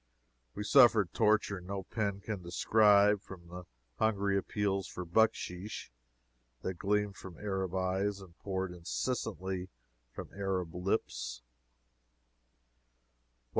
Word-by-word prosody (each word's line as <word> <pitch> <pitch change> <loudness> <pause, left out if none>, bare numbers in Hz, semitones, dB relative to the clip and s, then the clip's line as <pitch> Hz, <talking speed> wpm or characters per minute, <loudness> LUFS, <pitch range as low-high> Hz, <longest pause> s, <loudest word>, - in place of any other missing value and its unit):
We 105 - -3
suffered 115 - +6
torture 105 -3 +2
no 95 +2 -5
pen 100 0 -2
can 105 -2 -4
describe 105 +3 +4
from 85 -4 -12
the 90 0 -8 0.3
hungry 100 -2 +2
appeals 100 -1 0
for 90 - -6
bucksheesh 95 - 0 0.7
that 95 -2 -3
gleamed 105 0 0
from 90 -4 -10
Arab 95 -3 -2
eyes 95 +2 0
and 90 -4 -13
poured 95 -2 -2
incessantly 95 0 -3 0.4
from - - -8
Arab 95 -4 -2
lips. 60 - -2
95 Hz, 105 wpm, -32 LUFS, 90-105 Hz, 0.7 s, suffered